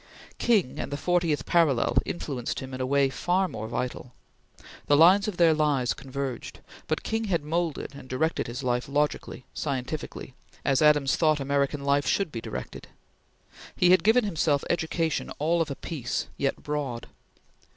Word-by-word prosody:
King 210 - +2
and - - -4
the 145 - -2
Fortieth 170 -1 0
Parallel 160 -8 +2
influenced 135 -8 -3
him 130 0 -8
in 130 - -4
a 130 - -1
way 140 0 +3
far 180 +6 +1
more 110 -9 -6
vital. 125 +1 -4 0.7
The 145 - +5
lines 190 +6 +6
of 205 -5 -3
their 165 -2 +5
lives 145 -5 +1
converged, 135 -2 -6 0.3
but - - -1
King 225 0 -1
had 175 -7 0
moulded 165 -1 -2
and 135 -2 -12
directed 160 +6 0
his 120 +4 -5
life 125 +1 -1
logically, 145 -2 -1
scientifically, 135 -1 -4 0.3
as 135 -2 +2
Adams 150 -3 +4
thought 155 -2 +3
American 140 +1 0
life 140 -1 +2
should 195 -6 +1
be 115 - -5
directed. - - -7 0.9
He 180 - +4
had 185 -3 +5
given 225 +4 +5
himself 160 -7 +1
education 165 -1 -1
all 165 +3 +1
of 165 - -1
a 140 - -4
piece, 135 -6 -3
yet 140 - -2
broad. 145 -5 -3
145 Hz, 160 wpm, -27 LUFS, 135-170 Hz, 0.9 s, lines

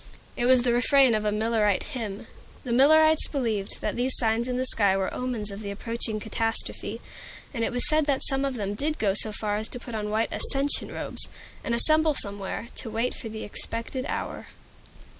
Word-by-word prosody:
It 240 - 0
was 255 -1 +5
the 245 -1 +2
refrain 260 +1 +4
of 215 -1 -1
a 210 - +1
Millerite 215 -2 +1
hymn. 215 -5 -5 0.4
The 250 - -5
Millerites 315 +5 +5
believed 225 -8 -2
that - - -2
these 255 +2 +1
signs 230 0 +1
in 250 -1 -2
the 255 - 0
sky 200 -6 +5
were 190 -1 -2
omens 240 -5 -2
of 200 +2 -8
the 205 - -6
approaching 220 +1 -3
catastrophe. 225 +1 -2 0.5
And 230 -4 -2
it - - 0
was 245 0 +1
said 310 -1 +2
that 275 -2 +1
some 270 0 +2
of 275 -2 -2
them 205 -3 -3
did 300 +8 -2
go 200 -3 +1
so 215 +2 +2
far 210 0 -2
as 215 +1 -4
to 245 - -3
put 240 0 -10
on 210 -1 -3
white 220 +2 -1
"ascension 280 +1 +1
robes," - - 0 0.3
and 235 - -1
assemble 310 +4 +4
somewhere, 200 -1 -3
to 230 - -4
wait 230 +3 -1
for 225 - -7
the 220 0 -7
expected 230 +5 -4
hour. - - -5
230 Hz, 200 wpm, -26 LUFS, 215-260 Hz, 0.5 s, was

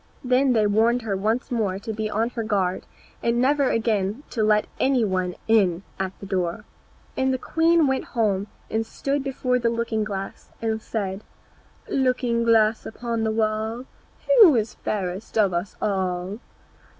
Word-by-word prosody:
Then 255 +1 +3
they 220 -2 +3
warned 225 +4 +2
her 205 -3 -1
once 220 +7 -1
more 210 -6 0
to 220 +3 -5
be 215 0 -3
on 225 +3 0
her 235 - -3
guard, 195 -4 -1 0.3
and 235 0 +1
never 275 +1 +3
again 220 +1 0
to 225 - -1
let 210 0 +3
any 260 -4 +3
one 185 -2 -1
in 195 -5 +3 0.2
at 190 -1 -1
the - - -8
door. 180 -3 -2 0.5
And 265 0 +1
the 260 - 0
queen 330 +4 +3
went 265 -1 0
home 205 -3 +1 0.2
and 220 0 +1
stood 275 +5 -2
before 255 -2 0
the 235 -1 +1
looking 230 -2 -1
glass 195 -2 -6
and 220 -1 -2
said, 200 -2 -4 0.6
"Looking 250 -3 +1
glass 225 -1 +3
against 230 0 -3
the 220 - +1
wall, 220 +2 -1 0.6
Who 340 -10 +9
is 220 -1 0
fairest 195 +1 -4
of 200 -4 +3
us 175 +4 -3
all?" 190 0 -2
220 Hz, 160 wpm, -24 LUFS, 200-240 Hz, 0.6 s, Who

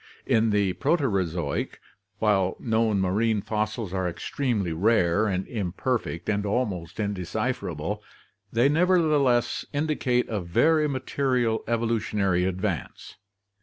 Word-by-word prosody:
In 110 0 +3
the 100 -3 +2
Proterozoic, 95 - -1 0.4
while 100 -4 +1
known 110 -3 +1
marine 105 +4 +1
fossils 110 -2 -2
are 95 -1 0
extremely 100 +1 -2
rare 100 +2 +2
and 95 -2 -1
imperfect 105 -2 -2
and 105 -1 0
almost 100 -5 -2
indecipherable, 100 -4 -2 0.5
they 120 +4 +3
nevertheless 150 -7 +3
indicate 145 -4 0
a 105 -3 -2
very 150 - +3
material 130 -4 0
evolutionary 105 -5 +1
advance. 95 - -4
110 Hz, 100 wpm, -26 LUFS, 95-125 Hz, 0.5 s, In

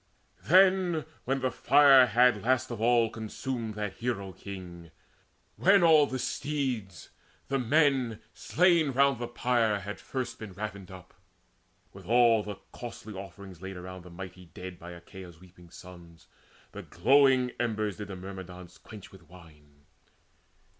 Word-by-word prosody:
Then, 185 -3 +4 0.2
when 135 +1 -1
the 130 0 0
fire 140 -3 +6
had 120 -1 +3
last 130 +2 0
of 115 -2 -6
all 115 -1 +3
consumed 115 0 -5
That 105 -2 -5
hero 105 -5 -3
king, 90 -3 -10 0.7
when 195 0 +4
all 155 -3 +6
the 130 - -4
steeds, 125 - -4 0.4
the 135 0 0
men 130 -3 +1
Slain 170 -5 +2
round 140 -1 +3
the 120 - -4
pyre 120 -4 0
had 105 +2 -7
first 125 -3 -5
been 110 -4 -9
ravined 100 -1 -7
up, 95 -2 -13 0.8
With - - -13
all 115 -1 +4
the 105 -1 -7 0.2
costly 115 -3 -9
offerings 95 -2 -10
laid 95 -1 -7
around 90 +1 -9
The 90 - -13
mighty 90 +1 -10
dead 90 +2 -10
by 85 +1 -10
Achaia's 85 0 -12
weeping 90 -1 -18
sons, 85 -2 -14 0.5
The - - -8
glowing 130 +5 +3
embers 110 -4 -2
did 105 -1 -7
the 100 - -7
Myrmidons 90 -1 -10
quench 105 -3 -13
With 90 -5 -17
wine. 75 -5 -18
110 Hz, 145 wpm, -28 LUFS, 95-130 Hz, 0.8 s, fire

